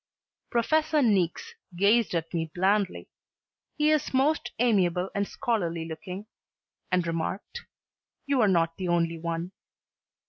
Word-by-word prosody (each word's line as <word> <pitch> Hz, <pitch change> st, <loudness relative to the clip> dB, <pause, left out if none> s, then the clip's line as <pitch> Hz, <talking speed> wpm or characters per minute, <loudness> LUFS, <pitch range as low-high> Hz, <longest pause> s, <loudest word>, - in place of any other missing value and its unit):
Professor 305 Hz, +5 st, +2 dB
Niecks 190 Hz, -7 st, +1 dB, 0.2 s
gazed 205 Hz, +2 st, +3 dB
at 165 Hz, 0 st, -3 dB
me 165 Hz, -1 st, -1 dB
blandly 195 Hz, +1 st, +1 dB, 0.7 s
he 305 Hz, 0 st, +3 dB
is 300 Hz, -3 st, 0 dB
most 290 Hz, +5 st, +2 dB
amiable 190 Hz, -6 st, +2 dB
and 200 Hz, 0 st, -1 dB
scholarly 175 Hz, -10 st, -2 dB
looking 180 Hz, +5 st, -7 dB, 0.7 s
and 180 Hz, -1 st, +2 dB
remarked, 170 Hz, -, -4 dB, 0.6 s
"You 280 Hz, -3 st, +2 dB
are 215 Hz, -, +5 dB
not 165 Hz, -3 st, +2 dB
the 185 Hz, -, -3 dB
only 170 Hz, -1 st, +1 dB
one." 170 Hz, +2 st, -3 dB
190 Hz, 125 wpm, -27 LUFS, 170-235 Hz, 0.7 s, are